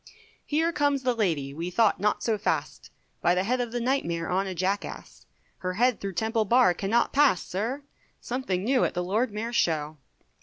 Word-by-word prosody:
Here 320 +3 +1
comes 285 -3 +1
the 250 0 +2
lady, 160 -12 -1
we 165 +4 -4
thought 215 +4 +2
not 210 +1 0
so 225 - +1
fast, - - -2 0.3
By 175 - +3
the 185 - +1
side 250 +5 0
of 240 -2 -3
the 240 - -2
Night 265 +3 +1
Mayor 170 0 -3
on 190 +2 0
a 190 - -4
jackass; 190 +3 -4 0.3
Her 185 0 -3
head 245 +4 +2
through 195 -1 -4
Temple 220 +3 0
Bar 235 -3 +4
cannot 200 +6 0
pass, 275 - +4
sir, 235 +10 -3 0.4
Something 235 -8 -3
new 255 +3 +2
at - - -1
the 180 - -1
Lord 215 +6 0
Mayor's 225 +3 -4
Show. 155 -2 0
210 Hz, 195 wpm, -27 LUFS, 180-245 Hz, 0.4 s, Bar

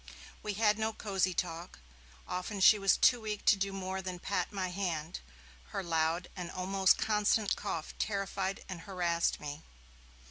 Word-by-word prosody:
We 210 - -3
had 215 0 +3
no 220 0 0
cosy 190 -4 0
talk; 170 0 -3 0.5
often 185 +3 -3
she 210 +2 +7
was 195 0 +4
too 245 -2 +5
weak 210 -1 -4
to - - +7
do 195 0 -1
more 190 0 -3
than 185 -1 -5
pat 200 +3 -2
my 190 -3 -2
hand; 175 -4 -3 0.5
her 195 - -4
loud 165 +1 0
and 180 -2 -5
almost 190 +1 +2
constant 210 -1 +2
cough 160 - -4
terrified 195 -2 -2
and 185 -3 -6
harassed 175 -3 0
me. 145 +1 -6
190 Hz, 155 wpm, -32 LUFS, 175-200 Hz, 0.5 s, she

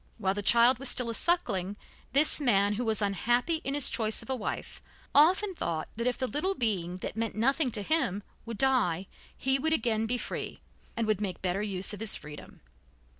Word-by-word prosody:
While 195 -4 0
the 205 - -4
child 235 +4 +4
was 270 -1 -1
still 240 -2 0
a - - -5
suckling, 205 - +1 0.4
this 295 +3 +3
man, 205 -6 +3
who 230 +4 -3
was 220 -2 0
unhappy 240 - +1
in 275 - -3
his 290 - +6
choice 220 -2 0
of - - -7
a - - 0
wife, 230 - -6 0.3
often 370 +7 +4
thought 165 - -4
that 235 +2 -2
if 250 - -1
the 260 - -1
little 310 +9 -1
being 185 - -1
that - - -6
meant 225 -1 -3
nothing 270 +6 +1
to 205 - 0
him 205 - 0 0.2
would 230 -2 -7
die, 210 -10 +1 0.3
he 265 +1 +1
would 320 +3 0
again 225 -5 0
be 245 +2 0
free, - - -5 0.4
and 230 - 0
would 215 -2 0
make 195 -3 -4
better 185 +2 -1
use 195 -1 0
of 205 - -7
his 220 -2 +3
freedom. 150 0 -11
230 Hz, 205 wpm, -28 LUFS, 200-265 Hz, 0.4 s, his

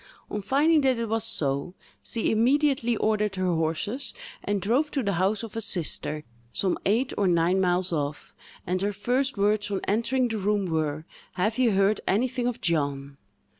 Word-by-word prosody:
On 210 - -2
finding 295 +9 +3
that 260 -3 +2
it 230 - -1
was 225 -1 +1
so, 140 +5 -1 0.3
she 230 - 0
immediately 245 0 +2
ordered 210 -2 0
her 185 -1 0
horses, 165 - -1 0.3
and 205 -1 0
drove 245 - +1
to 275 -3 -2
the 200 -2 0
house 200 +3 +1
of 225 -1 -8
a 225 - -1
sister, 170 -6 0 0.3
some 185 +8 0
eight 235 +6 +1
or 200 - +3
nine 175 +2 +2
miles 180 0 +2
off, 145 -1 -3 0.3
and 185 +1 -1
her 205 +1 0
first 250 +5 -1
words 205 +1 +1
on 200 -1 -1
entering 235 +5 +1
the 220 -2 -3
room 205 0 0
were, 155 -2 -2 0.3
"Have 215 +6 -1
you 240 -4 +3
heard 195 +2 +2
anything 245 +4 +1
of 245 - -3
John?" 140 -4 -1
205 Hz, 175 wpm, -26 LUFS, 180-235 Hz, 0.3 s, finding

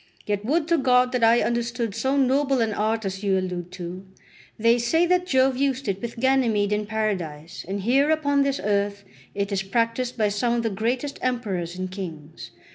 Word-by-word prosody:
Yet 205 -1 -2
would 305 +7 0
to 335 -2 +3
God 250 -1 +3
that 250 -2 0
I 230 +1 +5
understood 235 -2 -1
so 265 +6 0
noble 270 0 +2
an 225 -2 +1
art 220 +1 -1
as 190 0 -4
you 195 -2 +2
allude 180 -1 -4
to; 180 0 -7 0.5
they 230 +2 +3
say 320 +9 +2
that 360 +1 +1
Jove 260 -3 +3
used 275 -2 0
it 195 -1 -2
with 235 -1 -6
Ganymede 230 -6 +2
in 210 0 -1
paradise, 185 -7 -3
and 195 +1 -3
here 270 +8 +3
upon 285 -3 +2
this 275 0 0
earth 200 0 0 0.3
it 200 0 -2
is 195 -1 0
practised 230 +5 -1
by 215 -2 +2
some 220 +4 0
of 235 - -1
the 225 - -1
greatest 245 +8 -2
emperors 195 -9 -2
and 185 0 -4
kings. 155 -10 -8
225 Hz, 195 wpm, -24 LUFS, 195-260 Hz, 0.5 s, I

